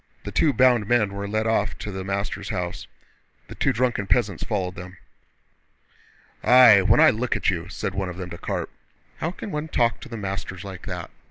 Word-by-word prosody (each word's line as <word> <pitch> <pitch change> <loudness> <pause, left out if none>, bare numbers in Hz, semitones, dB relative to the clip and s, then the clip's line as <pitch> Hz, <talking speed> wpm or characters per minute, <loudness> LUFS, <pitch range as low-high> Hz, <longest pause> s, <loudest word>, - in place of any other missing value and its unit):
The 105 - -6
two 150 +9 +3
bound 125 -4 +3
men 105 -4 +2
were 100 0 -4
led 110 +2 -1
off 105 -5 0
to 105 - -6
the 95 -1 -5
master's 100 +1 -3
house. 90 -1 -4 0.6
The - - -7
two - - +1
drunken 120 -4 0
peasants 100 -7 +1
followed 95 -5 -2
them. 90 +1 -10 1.5
"Aye, 125 -5 +8
when 95 - +4
I 155 0 +7
look 120 +3 -1
at - - +1
you!..." 90 +1 -5
said - - -4
one 95 -1 -2
of 90 - -8
them 90 -1 -6
to - - -7
Karp. - - -4 0.5
"How 160 - -2
can 185 +3 -7
one 150 0 -3
talk 120 -6 +1
to - - -10
the 115 - -6
masters 95 -2 -5
like 95 -1 -9
that? 90 -3 -6
100 Hz, 200 wpm, -24 LUFS, 95-120 Hz, 1.5 s, Aye